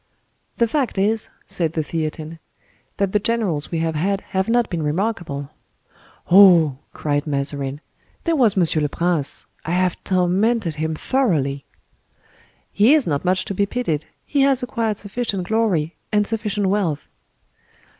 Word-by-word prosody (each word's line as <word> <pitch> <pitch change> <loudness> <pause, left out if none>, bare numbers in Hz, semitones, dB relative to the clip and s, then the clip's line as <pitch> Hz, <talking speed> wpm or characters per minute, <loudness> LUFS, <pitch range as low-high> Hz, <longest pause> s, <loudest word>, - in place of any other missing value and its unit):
"The 235 - +3
fact 260 -3 -1
is," 215 +3 +1 0.2
said 165 -3 -1
the 160 - -1
Theatin, 155 +1 -4 0.6
"that 200 -1 0
the 210 - +2
generals 205 -9 -1
we 170 - -2
have 165 0 0
had 195 +6 0
have 190 +2 0
not 240 -1 +3
been 170 -2 -3
remarkable." 155 -4 -2 0.8
"Oh!" 175 -8 +7
cried 145 0 -2
Mazarin, 140 0 -2 0.4
"there 335 -1 +1
was 235 -9 +3
Monsieur 165 -3 +2
le 150 - 0
Prince. 170 -3 -1 0.2
I - - -6
have 185 -1 0
tormented 185 +1 +1
him 160 +1 -2
thoroughly!" 155 - 0 1.1
"He 225 +9 +5
is 300 - +3
not 145 -2 -1
much 185 +1 +1
to - - -3
be 200 +1 +1
pitied: 165 -10 -2 0.2
he 285 - +1
has 270 -2 +3
acquired 230 -4 -1
sufficient 205 -3 -3
glory, 190 -8 +1 0.2
and 210 -1 +3
sufficient 210 -2 -1
wealth." 185 -7 -1
185 Hz, 145 wpm, -21 LUFS, 155-220 Hz, 1.1 s, Oh